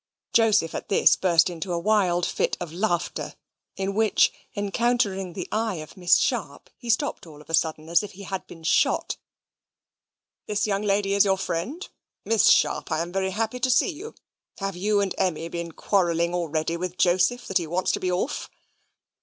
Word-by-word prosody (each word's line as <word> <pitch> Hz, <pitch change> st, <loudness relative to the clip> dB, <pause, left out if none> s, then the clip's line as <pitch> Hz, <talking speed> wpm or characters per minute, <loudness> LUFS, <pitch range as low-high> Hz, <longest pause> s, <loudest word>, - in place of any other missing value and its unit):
Joseph 215 Hz, -7 st, +3 dB
at -, -, -6 dB
this 195 Hz, -, +5 dB
burst 170 Hz, -3 st, +3 dB
out 180 Hz, -, -3 dB
into 175 Hz, +2 st, -5 dB
a 170 Hz, -, 0 dB
wild 180 Hz, -2 st, +2 dB
fit -, -, -1 dB
of 175 Hz, -3 st, -6 dB
laughter; 175 Hz, -2 st, -2 dB, 0.4 s
in 195 Hz, +1 st, -2 dB
which, 220 Hz, 0 st, +3 dB, 0.2 s
encountering 205 Hz, -3 st, 0 dB
the -, -, -5 dB
eye 220 Hz, -2 st, 0 dB
of 155 Hz, -2 st, -9 dB
Miss 180 Hz, -2 st, +4 dB
Sharp, -, -, -2 dB
he 240 Hz, -, -10 dB
stopped 235 Hz, -, 0 dB
all 150 Hz, -2 st, -13 dB
of 150 Hz, -, -13 dB
a -, -, -7 dB
sudden, 160 Hz, -1 st, +1 dB
as 170 Hz, +1 st, +3 dB
if 205 Hz, -, -8 dB
he 200 Hz, +2 st, -11 dB
had 190 Hz, -1 st, -5 dB
been 165 Hz, -, -13 dB
shot. 160 Hz, -, +1 dB, 1.3 s
"This 210 Hz, -1 st, 0 dB
young 200 Hz, -1 st, 0 dB
lady 200 Hz, -1 st, +1 dB
is 200 Hz, 0 st, +5 dB
your 195 Hz, -1 st, +2 dB
friend? 230 Hz, -, -4 dB, 0.4 s
Miss 225 Hz, -2 st, +4 dB
Sharp, -, -, +2 dB
I 155 Hz, -, +1 dB
am 170 Hz, -, -8 dB
very 190 Hz, 0 st, 0 dB
happy 225 Hz, +5 st, -2 dB
to 255 Hz, +1 st, +1 dB
see 255 Hz, -, +3 dB
you. 380 Hz, +9 st, -9 dB, 0.4 s
Have 195 Hz, -2 st, -3 dB
you 205 Hz, +3 st, +1 dB
and 195 Hz, -2 st, -1 dB
Emmy 165 Hz, -2 st, -1 dB
been 170 Hz, 0 st, -5 dB
quarrelling 170 Hz, -2 st, +1 dB
already 165 Hz, -1 st, -1 dB
with 180 Hz, +1 st, -5 dB
Joseph, 185 Hz, +7 st, +2 dB
that 190 Hz, -1 st, +1 dB
he 170 Hz, -, -5 dB
wants 175 Hz, +4 st, 0 dB
to -, -, -1 dB
be 185 Hz, -, -1 dB
off?" 180 Hz, +10 st, -2 dB
190 Hz, 190 wpm, -25 LUFS, 170-210 Hz, 1.3 s, this